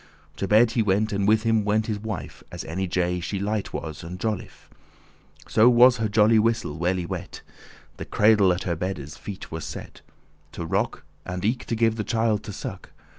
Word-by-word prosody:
*grunting - - -26
catarrh - - -31
To 100 - -2
bed 110 +3 +5
he 115 - +1
went, 105 +1 +1
and 100 0 0
with 110 +1 +4
him 115 -2 +2
went 105 +1 +1
his 110 -2 -3
wife, 105 -9 -6
As - - -6
any 95 +3 -3
jay 90 0 0
she 95 +3 -3
light 105 +1 -2
was 80 -2 -6
and 90 +2 -7
jolife,* 105 -2 -4
*jolly - - -27
So 115 +3 +5
was 125 +1 +6
her 110 -1 -1
jolly 110 +1 +5
whistle 110 -8 0
well 90 +2 +1
y 90 - -3
wet. - - -6 0.5
The - - -6
cradle 105 -3 +4
at 90 - -1
her 85 -3 -1
beddes 80 -4 -4
feet 100 -1 -8
was 80 -1 -5
set, - - -8 0.5
To 85 - -5
rock, - - -1 0.2
and 90 +2 -4
eke 120 +3 0
to 115 - -2
give 115 0 +2
the 105 - -1
child 110 -2 +1
to - - -6
suck. - - -7
105 Hz, 215 wpm, -25 LUFS, 90-110 Hz, 0.5 s, was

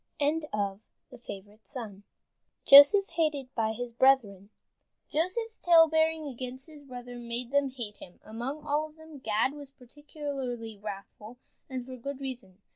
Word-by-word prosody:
JOSEPH 285 +9 +9
HATED 305 -6 -1
BY 220 -1 0
HIS 240 +1 -6
BRETHREN 230 -7 +3 0.6
Joseph's 390 +9 -2
talebearing 320 -2 +4
against 255 -1 -6
his 305 -3 -14
brethren 245 -2 -9
made 240 +1 -4
them 280 -1 +2
hate 235 -5 -7
him. 180 - -13
Among 245 +7 -5
all 300 +1 0
of 305 - -22
them 315 -2 -13
Gad 225 +2 +1
was 290 -2 -10
particularly 270 -4 -6
wrathful, 210 +3 -9 0.3
and 255 -2 -5
for 260 0 -8
good 275 +3 -6
reason. 240 -8 -8
265 Hz, 120 wpm, -29 LUFS, 235-295 Hz, 0.6 s, JOSEPH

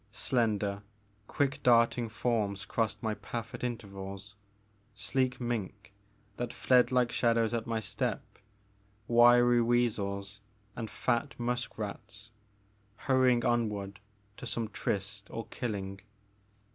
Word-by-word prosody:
Slender, 105 -5 0 0.5
quick 140 -1 0
darting 115 -1 +4
forms 105 -3 -1
crossed 110 +3 -1
my 110 -1 0
path 115 +1 -6
at - - -7
intervals, 100 -4 -5 0.6
sleek 125 +4 0
mink, 105 -4 -4 0.4
that 120 -1 -3
fled 125 -1 +3
like 125 -2 +3
shadows 115 -1 +2
at 115 -1 -2
my 115 -1 0
step, 110 - -2 0.8
wiry 120 0 +6
weasels 105 -4 0 0.4
and 115 -2 -4
fat 120 +4 -1
musk 125 +1 -2
rats, 110 +1 -7 0.6
hurrying 130 -1 +3
onward 105 -4 0 0.4
to 125 - -7
some 115 -1 -2
tryst 100 0 -3
or 115 - -5
killing. 100 -5 -4
115 Hz, 110 wpm, -31 LUFS, 105-120 Hz, 0.8 s, wiry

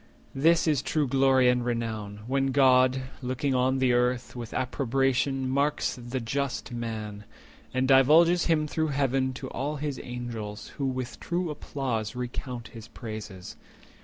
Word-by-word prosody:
This 165 +5 +3
is 150 -4 +2
true 150 -3 0
glory 135 -1 +4
and 125 0 +3
renown—when 115 +2 -2
God, 130 -1 +5
60 130 0 -5
Looking 130 +2 -1
on 130 +1 +2
the 130 -2 +3
Earth, 125 0 0
with 120 -2 -6
approbation 135 +1 0
marks 140 +3 0
The 125 +1 -4
just 130 +2 -3
man, 110 -3 -5 0.5
and 130 0 0
divulges 155 +6 +5
him 160 -2 +2
through 160 +1 -1
Heaven 135 -2 +1
To 130 +1 -6
all 145 +4 -2
his 145 -2 -3
Angels, 115 -4 -6
who 140 - 0
with 130 -2 -4
true 175 -1 -2
applause 130 -6 -3
Recount 125 -1 -5
his 115 -2 -11
praises. 110 -5 -8
130 Hz, 145 wpm, -27 LUFS, 120-135 Hz, 0.5 s, God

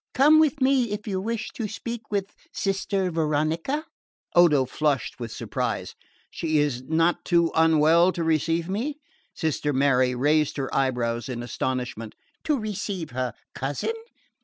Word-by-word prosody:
Come 300 +4 +6
with 310 -2 +2
me 260 -3 +3
if 210 0 -5
you 190 -2 -1
wish 225 +1 -3
to 225 - -3
speak 225 +1 -6
with 200 -2 -2 0.2
Sister 195 -1 -1
Veronica." 160 - 0 0.5
Odo 155 -6 +5
flushed 145 0 -1
with 115 -2 -5
surprise. - - -3 0.4
"She 155 -2 -1
is 145 -4 +1
not 165 +5 +1
too 170 -2 +2
unwell 160 +2 +5
to 170 - -2
receive 165 +1 +1
me?" 230 +10 -2 0.4
Sister 150 -2 -1
Mary 130 -2 +3
raised 150 +4 +2
her 135 -1 -3
eyebrows 125 -2 0
in 120 -2 -4
astonishment. 125 -3 -3 0.3
"To 300 -2 +2
receive 200 - -4
her 125 -2 -2 0.2
cousin? 140 - -2
160 Hz, 140 wpm, -25 LUFS, 135-200 Hz, 0.5 s, Come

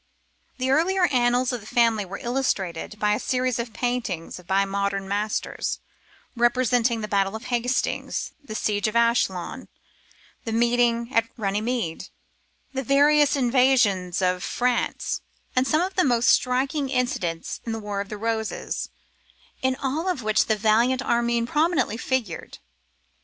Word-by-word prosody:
The 260 0 0
earlier 360 +6 +3
annals 245 0 +2
of 245 - -3
the 215 - -13
family 230 -4 +2
were 195 +2 -7
illustrated 210 -7 -2
by 210 -1 +2
a 210 - 0
series 255 -2 0
of 235 -1 -3
paintings 225 -9 -3
by 195 +1 +2
modern 195 0 -2
masters, 205 +2 -2 0.6
representing 240 -1 +2
the 210 - -3
battle 195 0 +1
of 220 - -7
Hastings, 245 +2 -1
the 215 -6 -7
siege 205 -1 0
of 215 - -4
Ascalon, 230 -6 +1 0.8
the 225 - -4
meeting 235 +1 +2
at 230 0 +2
Runnymede, 210 -3 -2 0.6
the 265 - -1
various 290 +3 +4
invasions 240 -9 +2
of 180 0 +1
France, 250 0 -1 0.3
and 255 +1 +2
some 310 +3 +2
of 375 +2 -1
the 370 - +2
most 240 -3 +3
striking 270 +3 +2
incidents 245 -11 -2
in 230 - -4
the 225 - -2
Wars 205 -1 -3
of - - -20
the 210 - -5
Roses, 220 0 -3 0.7
in 260 0 +1
all 290 +7 -2
of 290 -10 -2
which 215 +1 +2
a 220 - +4
valiant 230 +5 +2
Armyn 235 -1 +1
prominently 300 - +1
figured. 245 -9 -3
235 Hz, 145 wpm, -24 LUFS, 210-255 Hz, 0.8 s, various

